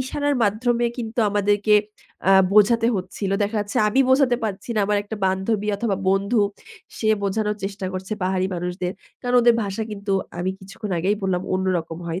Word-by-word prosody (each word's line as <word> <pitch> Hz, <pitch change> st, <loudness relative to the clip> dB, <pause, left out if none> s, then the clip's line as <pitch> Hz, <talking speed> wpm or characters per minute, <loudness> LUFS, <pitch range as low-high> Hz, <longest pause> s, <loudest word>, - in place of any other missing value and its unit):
ইশারার 285 Hz, +2 st, -1 dB
মাধ্যমে 235 Hz, +4 st, +1 dB
কিন্তু 230 Hz, 0 st, -5 dB
আমাদেরকে 205 Hz, +1 st, +2 dB, 0.6 s
আ -, -, +7 dB, 0.2 s
বোঝাতে 220 Hz, +2 st, +5 dB
হচ্ছিল। 190 Hz, +1 st, -4 dB
দেখা 210 Hz, +2 st, -1 dB
যাচ্ছে, 205 Hz, 0 st, -5 dB
আমি 260 Hz, +6 st, +2 dB
বোঝাতে 260 Hz, -2 st, +4 dB
পারছি 205 Hz, +1 st, -4 dB
না, 215 Hz, -, +2 dB
আমার 205 Hz, 0 st, +2 dB
একটা 205 Hz, +2 st, -7 dB
বান্ধবী 195 Hz, +3 st, -1 dB
অথবা 205 Hz, -2 st, -1 dB
বন্ধু 200 Hz, +4 st, +2 dB, 0.6 s
সে 220 Hz, -, 0 dB
বোঝানোর 210 Hz, +1 st, -1 dB
চেষ্টা 195 Hz, 0 st, -4 dB
করছে 190 Hz, +3 st, -5 dB
পাহাড়ি 185 Hz, 0 st, +1 dB
মানুষদের। 180 Hz, +1 st, -3 dB, 0.3 s
কারণ 245 Hz, -1 st, -1 dB
ওদের 240 Hz, 0 st, +6 dB
ভাষা 200 Hz, +2 st, -3 dB
কিন্তু 200 Hz, -1 st, -4 dB, 0.3 s
আমি 180 Hz, +2 st, -1 dB
কিছুক্ষণ 195 Hz, +2 st, -8 dB
আগেই 195 Hz, +5 st, +1 dB
বললাম 185 Hz, -2 st, 0 dB
অন্যরকম 175 Hz, -3 st, -1 dB
হয়। 170 Hz, +2 st, -3 dB
205 Hz, 165 wpm, -22 LUFS, 190-220 Hz, 0.6 s, আ